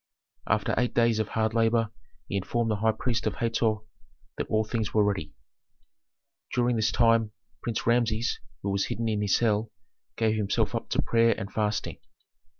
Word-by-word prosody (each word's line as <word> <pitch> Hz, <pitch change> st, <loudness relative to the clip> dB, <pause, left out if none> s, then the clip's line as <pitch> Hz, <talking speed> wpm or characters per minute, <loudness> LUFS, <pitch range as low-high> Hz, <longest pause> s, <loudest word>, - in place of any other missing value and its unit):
After -, -, +1 dB
eight 125 Hz, 0 st, 0 dB
days 115 Hz, -2 st, +3 dB
of 110 Hz, -, 0 dB
hard 110 Hz, 0 st, 0 dB
labor 115 Hz, -1 st, +2 dB, 0.4 s
he -, -, -4 dB
informed 115 Hz, +4 st, 0 dB
the 105 Hz, -, 0 dB
high 110 Hz, +2 st, +3 dB
priest 115 Hz, +2 st, -1 dB
of -, -, -1 dB
Hator 115 Hz, -1 st, +1 dB, 0.6 s
that -, -, -3 dB
all 110 Hz, 0 st, +2 dB
things 110 Hz, 0 st, -3 dB
were 105 Hz, -, +5 dB
ready. 100 Hz, -7 st, -2 dB, 1.2 s
During 120 Hz, 0 st, +2 dB
this 110 Hz, -2 st, +1 dB
time 115 Hz, -2 st, +3 dB, 0.3 s
Prince 115 Hz, -2 st, -3 dB
Rameses, 115 Hz, -1 st, +1 dB, 0.2 s
who 100 Hz, -, -1 dB
was 100 Hz, 0 st, +1 dB
hidden 115 Hz, 0 st, -2 dB
in 105 Hz, -2 st, 0 dB
his 100 Hz, -2 st, +3 dB
cell, 110 Hz, -1 st, +1 dB, 0.5 s
gave 110 Hz, -1 st, +2 dB
himself 105 Hz, -2 st, 0 dB
up -, -, -3 dB
to -, -, +1 dB
prayer 115 Hz, 0 st, +3 dB
and 100 Hz, -, -6 dB
fasting. 105 Hz, -1 st, -1 dB
110 Hz, 170 wpm, -27 LUFS, 105-115 Hz, 1.2 s, were